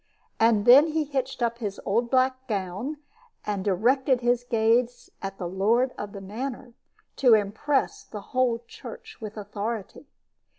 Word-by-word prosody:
And 225 Hz, -2 st, +4 dB
then 270 Hz, +6 st, +8 dB
he 315 Hz, 0 st, 0 dB
hitched 265 Hz, -3 st, -3 dB
up 235 Hz, 0 st, -1 dB
his 205 Hz, -4 st, -4 dB
old 235 Hz, +4 st, +1 dB
black 260 Hz, 0 st, +1 dB
gown, 205 Hz, +8 st, -3 dB, 0.5 s
and 205 Hz, -2 st, -2 dB
directed 245 Hz, +7 st, +2 dB
his 245 Hz, 0 st, +1 dB
gaze 240 Hz, +1 st, +1 dB
at 195 Hz, 0 st, -5 dB
the 180 Hz, -, -4 dB
lord 225 Hz, +8 st, +1 dB
of 205 Hz, -1 st, -6 dB
the 200 Hz, -, -8 dB
manor, 245 Hz, +5 st, -6 dB, 0.4 s
to 245 Hz, -4 st, +6 dB
impress 220 Hz, +7 st, 0 dB
the 210 Hz, -, -8 dB
whole 245 Hz, -2 st, +1 dB
church 450 Hz, -, -11 dB
with 215 Hz, 0 st, -7 dB
authority. 210 Hz, +5 st, -5 dB
235 Hz, 145 wpm, -26 LUFS, 205-260 Hz, 0.5 s, then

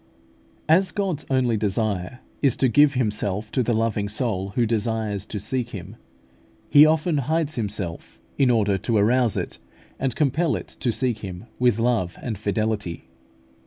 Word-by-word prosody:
As 185 Hz, +5 st, +4 dB
God's 195 Hz, -7 st, -2 dB
only 125 Hz, -4 st, +2 dB
desire 105 Hz, +1 st, -2 dB, 0.2 s
is 140 Hz, -4 st, +3 dB
to 130 Hz, -, +3 dB
give 145 Hz, +3 st, +4 dB
Himself 105 Hz, -3 st, -1 dB
to 130 Hz, -, +1 dB
the 120 Hz, -1 st, +1 dB
loving 110 Hz, -2 st, 0 dB
soul 105 Hz, -4 st, -1 dB
who 120 Hz, -, +3 dB
desires 110 Hz, -2 st, -1 dB
to 105 Hz, -, -4 dB
seek 120 Hz, +4 st, -2 dB
Him, 100 Hz, -1 st, -8 dB, 0.8 s
He 150 Hz, +1 st, +8 dB
often 160 Hz, +1 st, +1 dB
hides 155 Hz, +3 st, 0 dB
Himself 100 Hz, -, -4 dB, 0.2 s
in 135 Hz, -2 st, +3 dB
order 105 Hz, -5 st, +2 dB
to 115 Hz, +4 st, 0 dB
arouse 115 Hz, +2 st, +3 dB
it, -, -, -4 dB, 0.4 s
and 130 Hz, -3 st, -1 dB
compel 150 Hz, +3 st, +1 dB
it -, -, -6 dB
to 125 Hz, -, +1 dB
seek 120 Hz, -1 st, -1 dB
Him 95 Hz, 0 st, -7 dB
with 125 Hz, -3 st, +3 dB
love 115 Hz, -7 st, 0 dB
and 115 Hz, -4 st, -4 dB
fidelity. 105 Hz, -3 st, -2 dB
115 Hz, 160 wpm, -23 LUFS, 105-130 Hz, 0.8 s, He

